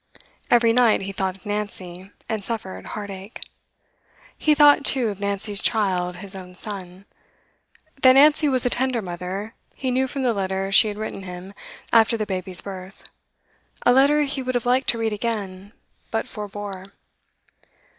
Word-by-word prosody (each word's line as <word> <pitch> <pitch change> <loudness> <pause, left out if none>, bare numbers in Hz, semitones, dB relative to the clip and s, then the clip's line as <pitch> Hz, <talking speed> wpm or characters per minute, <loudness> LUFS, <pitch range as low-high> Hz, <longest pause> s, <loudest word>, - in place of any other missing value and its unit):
Every 235 -1 +4
night 235 -4 +4
he 195 - -4
thought 190 -1 -3
of 190 - -25
Nancy, 195 -3 -3 0.2
and 220 -3 -3
suffered 195 - -3
heartache. 200 0 -7 1.0
He 305 -1 +2
thought, 290 -1 +6
too, 255 -4 +2
of 200 -2 -6
Nancy's 200 0 -1
child, 185 -6 +1
his 195 +1 -6
own 180 -1 -10
son. 190 -2 -6 1.0
That 255 0 +8
Nancy 295 +2 +5
was 255 -2 +1
a 245 - +1
tender 255 -3 0
mother, 185 +4 -5 0.2
he 260 -2 -2
knew 260 +1 +1
from 270 +1 -4
the 245 -2 +2
letter 195 -1 -2
she 215 +3 +6
had 205 -1 -4
written 215 -2 -5
him 185 +1 -9 0.4
after 230 0 +5
the 215 - -2
baby's 185 -2 -2
birth, 190 -1 -9 0.8
a 245 - +6
letter 285 +3 +4
he 275 -1 -3
would 255 0 -3
have 245 - -1
liked 255 +2 +2
to 235 - +2
read 225 -1 -1
again, 205 -3 -4 0.4
but 225 - -2
forbore. 205 -2 -7
210 Hz, 160 wpm, -23 LUFS, 190-245 Hz, 1.0 s, That